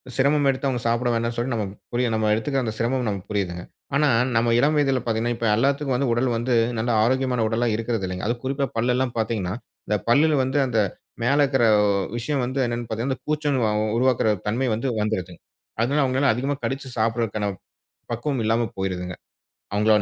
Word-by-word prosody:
சிரமம் 140 +2 +3
எடுத்து 135 +1 0
அவங்க 125 -3 -1
சாப்பிட 120 +1 +1
வேண்டாம்ன்னு 115 0 -1
சொல்லி 120 +2 -1
நம்ம 110 -3 -1 0.3
புரிய 125 +1 +1
நம்ம 110 -1 +1
எடுத்துக்கிற 120 +1 -1
சிரமம் 125 +2 0
நம்ம 100 -2 -1
புரியுதுங்க. 90 -4 -2 0.3
ஆனா 145 +1 +3 0.3
நம்ம 115 +1 +3
இளம் 150 +4 +3
வயதில 135 -3 +2
பாத்தீங்கன்னா, 115 +1 0
இப்ப 115 - -2
எல்லாத்துக்கும் 135 +1 +1
உடல் 120 +2 +1
வந்து 120 +2 -1 0.3
நல்ல 115 +2 -1
ஆரோக்கியமான 125 -1 +1
உடலா 115 +2 0
இருக்கறது 115 -2 -2
இல்லை. 90 0 -4
அதும் 120 +1 -1
குறிப்பா 135 +1 0
பல் 120 +2 +2
எல்லாம் 130 -1 0
பாத்தீங்கன்னா 105 -5 -1 0.3
அந்தப் 105 -3 -1
பல்லுல 150 +5 +4
வந்து 130 +2 -1
அந்த 120 -3 -1 0.5
மேல 135 +4 +3
இருக்கிற 135 -3 +2 0.5
விஷயம் 135 +3 -1
வந்து 130 +2 -3
என்னன்னு 120 0 -3
பாத்தீங்கன்னா 120 +5 -2
கூச்சம் 150 -3 0 0.4
உருவாக்குற 125 -3 +2 0.2
தன்மை 120 +5 0
வந்து 115 +5 -3
வந்துடுது. 95 -5 -2 0.5
அதுனால 140 +5 +2
அவங்கலால 130 +1 +2
அதிகமா 135 +5 -1
கடிச்சு 135 0 -3
சாப்பிடுற 110 -2 0 0.6
பக்குவம் 120 +2 -2
இல்லாம 115 +1 +1
போயிருதுங்க. 90 -2 -3 0.6
அவங்க 105 +1 +1
120 Hz, 170 wpm, -23 LUFS, 110-135 Hz, 0.6 s, பல்லுல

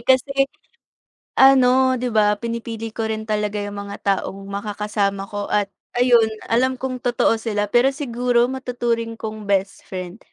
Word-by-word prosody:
kasi, 275 +1 +3 0.9
ano 260 -1 +6
'di 250 0 -2
ba, 210 -1 +3
pinipili 230 0 -5
ko 225 0 -3
rin 220 0 -3
talaga 210 -1 -1
yung 205 0 -6
mga 200 - -6
taong 195 0 -1
makakasama 205 -1 -2
ko, 205 0 -4
at 205 -1 0 0.2
ayun 245 -2 +5 0.2
alam 260 +3 +3
kong 255 0 -4
totoo 240 -2 +1
sila. 210 -2 -2
Pero 255 +3 +4
siguro 245 -3 +1
matuturing 240 -3 -2
kong 215 -1 -7
best 195 -1 0
friend, 185 +2 -6
225 Hz, 145 wpm, -21 LUFS, 210-250 Hz, 0.9 s, ano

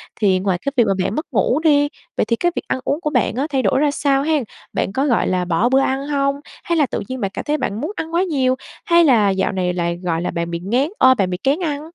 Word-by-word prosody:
Thì 190 -3 +2
ngoài 190 -1 0
cái 280 +10 -3
việc 240 - +6
mà 195 - +2
bạn 195 - -2
mất 310 - -2
ngủ 245 +6 +2
đi, 290 -3 +3 0.3
vậy - - +2
thì 230 - +1
cái 350 +9 0
việc - - -3
ăn - - -1
uống 290 +4 -1
của 300 - -1
bạn 250 -6 0
á, 275 +4 -1
thay 270 -2 0
đổi 210 +4 +2
ra 295 0 +2
sao 280 -1 +1
hén? 300 -3 +1 0.3
Bạn 195 - -1
có, 270 +4 0
gọi 245 -5 +2
là, 180 -1 0
bỏ 175 +7 +1
bữa 265 +1 +4
ăn 270 +1 -1
hông? 275 -1 0 0.3
Hay 340 -1 0
là 295 - +4
tự 250 - -4
nhiên 260 0 -5
bạn 195 -1 -1
cảm - - -5
thấy 300 +1 0
bạn 210 -6 -3
muốn 310 - -3
ăn 320 +1 -5
quá 345 +2 +2
nhiều, 265 -8 +1 0.3
hay 340 0 +5
là 230 -9 +4
dạo 190 0 0
này 180 -2 -1
lại, 170 -1 -2
gọi 165 -1 -1
là, - - -2
bạn 170 0 -3
bị 170 - -3
nghén 245 - 0
ơ, 260 0 +6
bạn 195 -4 0
bị 180 - -2
kén 280 +6 +2
ăn? 295 -4 -2
260 Hz, 290 wpm, -19 LUFS, 195-290 Hz, 0.3 s, việc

